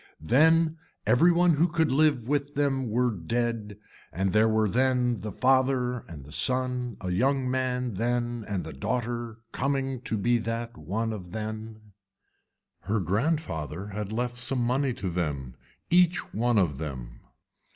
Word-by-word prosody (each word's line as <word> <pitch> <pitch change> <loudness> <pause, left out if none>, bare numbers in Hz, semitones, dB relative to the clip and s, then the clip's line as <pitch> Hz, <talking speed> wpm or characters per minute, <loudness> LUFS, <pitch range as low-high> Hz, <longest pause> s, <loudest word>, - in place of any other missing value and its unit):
Then 160 - +4 0.3
every 170 +8 +5
one 170 -2 +4
who 165 +4 +4
could 160 -3 +1
live 140 -4 +3
with 145 0 -1
them 135 -3 0
were 120 +2 +2
dead 110 +2 -2 0.3
and 95 +2 -1
there 110 +1 +5
were 110 0 +2
then 125 +1 +1
the 105 - -5
father 130 +1 +2
and 75 -5 -10
the 75 - -13
son 125 +1 0
a 90 -1 -3
young 130 +8 +1
man 125 -2 -1
then 120 +2 -1
and 100 -4 -2
the - - -7
daughter 120 - -3
coming 135 -1 -1
to 110 - -1
be 120 +4 +2
that 115 +1 -4
one 105 +9 -2 0.2
then. 110 0 -6 0.9
Her 105 +4 -1
grandfather 95 - -1
had 105 0 -5
left 120 +2 -2
some 125 +1 -1
money 130 +2 +1
to 95 -2 -3
them 70 -8 -3 0.4
each 175 0 +3
one 120 +1 +2
of 80 -9 +1
them. 65 -6 -6
120 Hz, 150 wpm, -27 LUFS, 105-130 Hz, 0.9 s, every